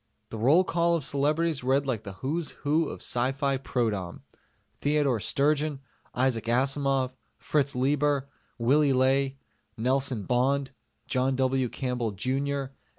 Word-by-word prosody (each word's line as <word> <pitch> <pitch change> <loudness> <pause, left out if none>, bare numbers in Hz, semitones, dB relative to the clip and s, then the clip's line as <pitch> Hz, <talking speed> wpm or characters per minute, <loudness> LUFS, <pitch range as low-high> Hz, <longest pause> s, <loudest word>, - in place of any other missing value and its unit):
The 115 - -5
roll 145 +11 +5
call 170 -1 +1
of 155 -5 -3
celebrities 150 +1 0
read 135 +2 +2
like 125 -6 -1
the 100 -3 -8
Who's 145 - -3 0.2
Who 155 +2 +2
of - - -8
S.F. 135 +2 0
Prodom: 105 -8 -2 0.6
Theodore 145 -5 +1
Sturgeon, 145 +4 0 0.4
Isaac 125 -3 +1
Asimov, 135 +1 +1 0.2
Fritz 140 -3 0
Leiber, 140 +1 +1 0.3
Willy 140 +4 +3
Ley, 135 +1 +2 0.4
Nelson 130 -1 0
Bond, 135 +4 +1 0.4
John 130 +1 +1
W. 130 -1 +1
Campbell 125 -4 -2
Jr. 135 +5 -1
135 Hz, 125 wpm, -27 LUFS, 125-145 Hz, 0.6 s, roll